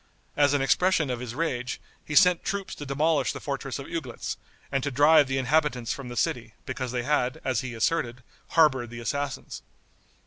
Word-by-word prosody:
As 145 Hz, -1 st, +4 dB
an 140 Hz, -, +1 dB
expression 170 Hz, -1 st, +2 dB
of 125 Hz, -, -3 dB
his 120 Hz, -1 st, -6 dB
rage, 125 Hz, -6 st, -2 dB, 0.2 s
he 150 Hz, -, -5 dB
sent 180 Hz, 0 st, +6 dB
troops 200 Hz, -1 st, -3 dB
to 145 Hz, -, -8 dB
demolish 150 Hz, +3 st, +1 dB
the -, -, -6 dB
fortress 135 Hz, -2 st, -4 dB
of 140 Hz, -, -7 dB
Uglitz, 145 Hz, -8 st, -4 dB, 0.4 s
and 135 Hz, -1 st, +1 dB
to 140 Hz, -, -1 dB
drive 145 Hz, +2 st, +5 dB
the 135 Hz, 0 st, -1 dB
inhabitants 135 Hz, -3 st, +1 dB
from 140 Hz, -2 st, -7 dB
the 120 Hz, -, -7 dB
city, 115 Hz, -1 st, -1 dB
because 130 Hz, -1 st, -4 dB
they 125 Hz, -1 st, -2 dB
had, 130 Hz, -2 st, 0 dB
as 130 Hz, -4 st, +1 dB
he 125 Hz, -2 st, -6 dB
asserted, 125 Hz, 0 st, 0 dB, 0.2 s
harbored 135 Hz, -7 st, +3 dB
the 120 Hz, 0 st, -8 dB
assassins. 140 Hz, +3 st, -4 dB
135 Hz, 185 wpm, -27 LUFS, 125-150 Hz, 0.4 s, sent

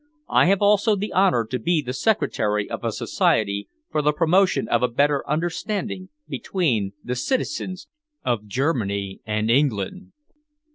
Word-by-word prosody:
I -, -, +5 dB
have 195 Hz, +2 st, +3 dB
also 210 Hz, +1 st, +4 dB
the 205 Hz, +2 st, -4 dB
honour 185 Hz, -12 st, +3 dB
to 125 Hz, +3 st, -3 dB
be 170 Hz, +7 st, +1 dB
the 125 Hz, -4 st, -4 dB
secretary 105 Hz, -, 0 dB
of -, -, -6 dB
a -, -, 0 dB
society 100 Hz, 0 st, 0 dB, 0.2 s
for 150 Hz, -, +1 dB
the 150 Hz, 0 st, +3 dB
promotion 175 Hz, -, +2 dB
of 120 Hz, -, +2 dB
a 125 Hz, -, +3 dB
better 140 Hz, +3 st, +1 dB
understanding 180 Hz, +4 st, -2 dB, 0.2 s
between 115 Hz, -, -1 dB
the 125 Hz, -, -3 dB
citizens 185 Hz, -, -2 dB, 0.4 s
of 110 Hz, -4 st, -1 dB
Germany 100 Hz, -6 st, -1 dB
and 110 Hz, +1 st, 0 dB
England." 135 Hz, -, 0 dB
145 Hz, 145 wpm, -23 LUFS, 110-185 Hz, 0.4 s, I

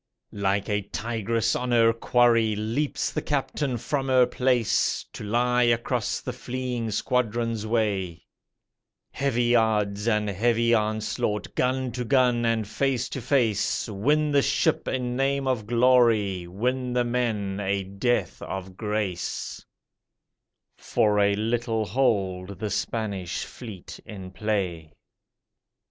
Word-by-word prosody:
Like 100 Hz, 0 st, 0 dB
a 105 Hz, -1 st, 0 dB
tigress 115 Hz, +2 st, -1 dB
on 125 Hz, 0 st, -2 dB
her 115 Hz, -1 st, +4 dB
quarry 115 Hz, -2 st, +3 dB
leaps 115 Hz, +8 st, -1 dB
the -, -, -2 dB
'Captain' 140 Hz, -2 st, -1 dB
from 135 Hz, +4 st, -2 dB
her 130 Hz, -1 st, +5 dB
place, 125 Hz, -3 st, +1 dB
To -, -, -7 dB
lie 125 Hz, +3 st, +1 dB
across 120 Hz, -1 st, +1 dB
the -, -, -5 dB
fleeing 125 Hz, -2 st, -4 dB
squadron's 115 Hz, 0 st, -1 dB
way: 100 Hz, -7 st, -1 dB, 0.9 s
Heavy 120 Hz, -3 st, +1 dB
odds 105 Hz, -2 st, +1 dB
and 105 Hz, -2 st, +2 dB
heavy 115 Hz, +4 st, +2 dB
onslaught, 110 Hz, -1 st, -1 dB
gun 130 Hz, 0 st, 0 dB
to 125 Hz, +1 st, -3 dB
gun 125 Hz, -1 st, +2 dB
and 110 Hz, -2 st, 0 dB
face 130 Hz, +2 st, -1 dB
to 135 Hz, -, -5 dB
face, 120 Hz, -5 st, +1 dB
Win 145 Hz, +9 st, +1 dB
the 140 Hz, -1 st, +4 dB
ship 140 Hz, 0 st, +1 dB
a -, -, 0 dB
name 135 Hz, +2 st, -1 dB
of 120 Hz, -5 st, -1 dB
glory, 115 Hz, -7 st, +3 dB
win 125 Hz, +7 st, -2 dB
the 125 Hz, 0 st, +2 dB
men 110 Hz, -5 st, -1 dB
a 100 Hz, 0 st, -1 dB
death 100 Hz, +6 st, -1 dB
of 95 Hz, -1 st, -6 dB
grace, 105 Hz, -4 st, -3 dB, 1.1 s
For 105 Hz, -1 st, +1 dB
a 100 Hz, 0 st, +3 dB
little 115 Hz, +1 st, -1 dB
hold 100 Hz, -5 st, 0 dB
the 105 Hz, -1 st, -3 dB
Spanish 100 Hz, -4 st, -2 dB
fleet 110 Hz, -8 st, -10 dB
in 95 Hz, -3 st, -8 dB
play. 95 Hz, -6 st, -2 dB
115 Hz, 125 wpm, -25 LUFS, 105-125 Hz, 1.1 s, her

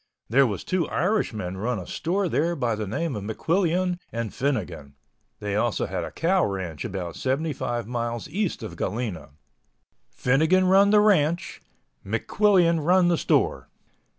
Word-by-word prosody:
There 135 Hz, +2 st, +5 dB
was 100 Hz, -5 st, -4 dB
two 185 Hz, -4 st, -1 dB
Irishmen 120 Hz, -, -1 dB
run 115 Hz, +4 st, -1 dB
a 90 Hz, -, -6 dB
store 185 Hz, +4 st, -1 dB
there 170 Hz, +2 st, 0 dB
by 125 Hz, -6 st, 0 dB
the 105 Hz, -1 st, -3 dB
name 135 Hz, -, -2 dB
of 105 Hz, -, -5 dB
McQuillian 175 Hz, -, 0 dB
and 115 Hz, -2 st, -4 dB
Finnegan. 90 Hz, -, -3 dB, 0.4 s
They 105 Hz, -2 st, -3 dB
also 115 Hz, +1 st, 0 dB
had 90 Hz, -2 st, -3 dB
a -, -, -5 dB
cow 185 Hz, +2 st, +1 dB
ranch 95 Hz, -6 st, -3 dB
about 95 Hz, -6 st, -5 dB
75 130 Hz, -4 st, -2 dB
miles 120 Hz, 0 st, -3 dB
east 195 Hz, -, -2 dB
of 110 Hz, -, -7 dB
Galena. 105 Hz, -6 st, -3 dB, 0.8 s
Finnegan 155 Hz, -, +2 dB
run 195 Hz, +2 st, +5 dB
the 210 Hz, 0 st, +5 dB
ranch, 175 Hz, -4 st, +2 dB, 0.4 s
McQuillian 170 Hz, -, +2 dB
run 180 Hz, +2 st, +4 dB
the 175 Hz, -, +3 dB
store. -, -, +1 dB
130 Hz, 150 wpm, -25 LUFS, 105-175 Hz, 0.8 s, There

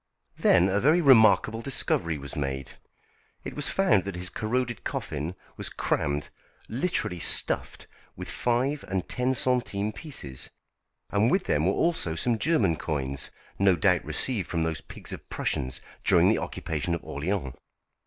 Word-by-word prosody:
Then 90 Hz, -, +4 dB
a 100 Hz, +1 st, +2 dB
very 150 Hz, +9 st, +4 dB
remarkable 115 Hz, -5 st, +5 dB
discovery 85 Hz, -, 0 dB
was 70 Hz, +2 st, -7 dB
made. 70 Hz, -3 st, -3 dB, 0.7 s
It -, -, -6 dB
was 145 Hz, -, -1 dB
found 185 Hz, -, +3 dB
that 100 Hz, -2 st, -4 dB
his 90 Hz, 0 st, -4 dB
corroded 120 Hz, +1 st, -2 dB
coffin 80 Hz, +4 st, -3 dB, 0.2 s
was -, -, -2 dB
crammed 75 Hz, 0 st, -1 dB, 0.4 s
literally 120 Hz, -, -1 dB
stuffed -, -, -1 dB, 0.3 s
with -, -, -7 dB
five 130 Hz, +5 st, 0 dB
and 95 Hz, -1 st, -2 dB
ten 125 Hz, +1 st, +1 dB
centimes 110 Hz, -5 st, 0 dB
pieces, 70 Hz, -, -5 dB, 0.6 s
and 105 Hz, +3 st, +3 dB
with 190 Hz, +5 st, +2 dB
them 75 Hz, +3 st, +1 dB
were 95 Hz, -, +3 dB
also 165 Hz, -, 0 dB
some 115 Hz, +6 st, +1 dB
German 105 Hz, -, +2 dB
coins, 70 Hz, -4 st, -3 dB, 0.3 s
no 95 Hz, -2 st, +5 dB
doubt 90 Hz, 0 st, +3 dB
received 95 Hz, -, -1 dB
from 85 Hz, -2 st, -1 dB
those 80 Hz, -1 st, -2 dB
pigs -, -, -9 dB
of -, -, -9 dB
Prussians 65 Hz, 0 st, -2 dB, 0.2 s
during -, -, +5 dB
the -, -, +3 dB
occupation 80 Hz, +2 st, -2 dB
of 85 Hz, -, -7 dB
Orléans. 75 Hz, -2 st, -3 dB
95 Hz, 150 wpm, -27 LUFS, 80-125 Hz, 0.7 s, remarkable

